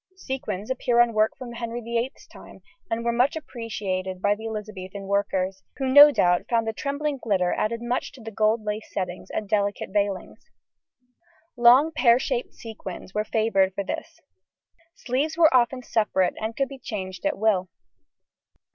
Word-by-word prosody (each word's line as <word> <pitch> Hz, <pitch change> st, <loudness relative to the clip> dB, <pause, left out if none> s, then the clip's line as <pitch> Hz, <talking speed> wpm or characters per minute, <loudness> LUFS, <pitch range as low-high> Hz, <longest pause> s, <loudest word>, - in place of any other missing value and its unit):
Sequins 235 Hz, -, -4 dB
appear 245 Hz, -2 st, +1 dB
on 240 Hz, -1 st, +4 dB
work 215 Hz, 0 st, +2 dB
from 250 Hz, -2 st, -8 dB
Henry 235 Hz, 0 st, -5 dB
VIII's 235 Hz, +3 st, -3 dB
time, -, -, -14 dB, 0.3 s
and 230 Hz, +1 st, -2 dB
were 235 Hz, -, +2 dB
much 250 Hz, +5 st, +2 dB
appreciated 200 Hz, -10 st, -4 dB
by 205 Hz, +2 st, +2 dB
the 220 Hz, +2 st, -6 dB
Elizabethan 205 Hz, -3 st, -6 dB
workers, 195 Hz, -1 st, -1 dB, 0.2 s
who 270 Hz, -, -2 dB
no 285 Hz, +3 st, +10 dB
doubt 175 Hz, -10 st, +2 dB
found 230 Hz, -1 st, +2 dB
the 225 Hz, -, -1 dB
trembling 285 Hz, +3 st, -3 dB
glitter 190 Hz, -7 st, +1 dB
added 230 Hz, +2 st, -2 dB
much 240 Hz, +1 st, -2 dB
to -, -, -14 dB
the 225 Hz, -, -7 dB
gold 215 Hz, +1 st, +1 dB
lace 210 Hz, +1 st, -4 dB
settings 180 Hz, -2 st, -4 dB
and 215 Hz, -, -4 dB
delicate 200 Hz, -1 st, -1 dB
veilings: 200 Hz, -2 st, -2 dB, 1.1 s
long 250 Hz, +6 st, +6 dB
pear 245 Hz, -7 st, +4 dB
shaped 255 Hz, -1 st, -3 dB
sequins 195 Hz, -4 st, -9 dB
were 210 Hz, -, 0 dB
favoured 205 Hz, -4 st, +1 dB
for 200 Hz, -, -2 dB
this. -, -, -6 dB, 0.8 s
Sleeves 285 Hz, +6 st, -2 dB
were 320 Hz, -5 st, +5 dB
often 250 Hz, +1 st, +2 dB
separate, 210 Hz, -6 st, +1 dB
and 220 Hz, +1 st, -4 dB
could 275 Hz, -, +1 dB
be 275 Hz, -1 st, -10 dB
changed 190 Hz, -7 st, -6 dB
at -, -, 0 dB
will. 195 Hz, -4 st, +1 dB
225 Hz, 165 wpm, -25 LUFS, 200-245 Hz, 1.1 s, no